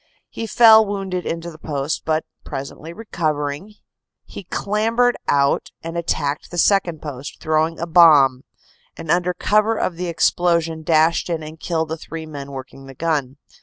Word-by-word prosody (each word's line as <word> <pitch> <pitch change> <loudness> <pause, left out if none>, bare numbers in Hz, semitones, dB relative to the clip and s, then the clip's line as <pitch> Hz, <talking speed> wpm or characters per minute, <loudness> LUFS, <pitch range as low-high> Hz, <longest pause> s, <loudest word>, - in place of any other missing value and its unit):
He 225 - -6
fell 220 -1 +7
wounded 195 -3 -4
into 170 +1 -4
the 160 - -14
post, 145 -1 -3
but 155 0 0 0.2
presently 140 +3 -7
recovering, 160 -2 -3 0.5
he 195 - -10
clambered 225 +6 +1
out 140 0 +2
and 165 +1 -6
attacked 155 -4 -2
the 175 - -7
second 175 -3 +2
post, 145 -2 -7
throwing 160 +1 0
a 170 - -2
bomb, 150 -6 +5 0.5
and 165 -2 -4
under 180 0 +1
cover 215 +2 +2
of 175 - -2
the 180 0 -3
explosion 170 -1 +1
dashed 160 +2 +2
in 165 -2 -2
and 155 +1 -10
killed 160 -2 -2
the 160 - -3
three 160 0 -8
men 140 -3 -8
working 135 0 -9
the 135 - -11
gun. 145 -4 -2
165 Hz, 160 wpm, -20 LUFS, 150-180 Hz, 0.5 s, fell